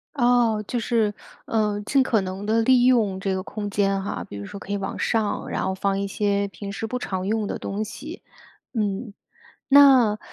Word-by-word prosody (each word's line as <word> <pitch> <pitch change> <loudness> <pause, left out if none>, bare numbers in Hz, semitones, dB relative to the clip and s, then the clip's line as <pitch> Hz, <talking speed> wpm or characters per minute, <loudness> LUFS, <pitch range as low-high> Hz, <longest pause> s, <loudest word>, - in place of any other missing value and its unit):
哦， 240 -4 +3
就 245 - -1
是， 220 -2 +1 0.3
呃， 210 -2 0
尽 270 +3 +3
可 235 -5 +2
能 190 +1 -5
地 225 +2 +2
利 250 +1 +4
用 220 -7 +3
这 195 0 -1
个 185 - -3
空 205 0 -5
间 195 -1 +1
哈。 200 - -4
比 - - -9
如 100 - -6
说 200 - -8
可 200 - -9
以 - - 0
往 195 -1 -4
上， 220 -3 -1
然 - - -2
后 190 0 -1
放 195 +1 0
一 200 - -2
些 200 0 0
平 200 0 -8
时 200 +3 -4
不 250 - -3
常 190 -5 -3
用 215 0 0
的 - - -4
东 205 +2 -3
西。 295 - -9 0.5
嗯， 210 0 -2 0.5
那 265 -6 +6
210 Hz, 215 characters per minute, -24 LUFS, 200-235 Hz, 0.5 s, 那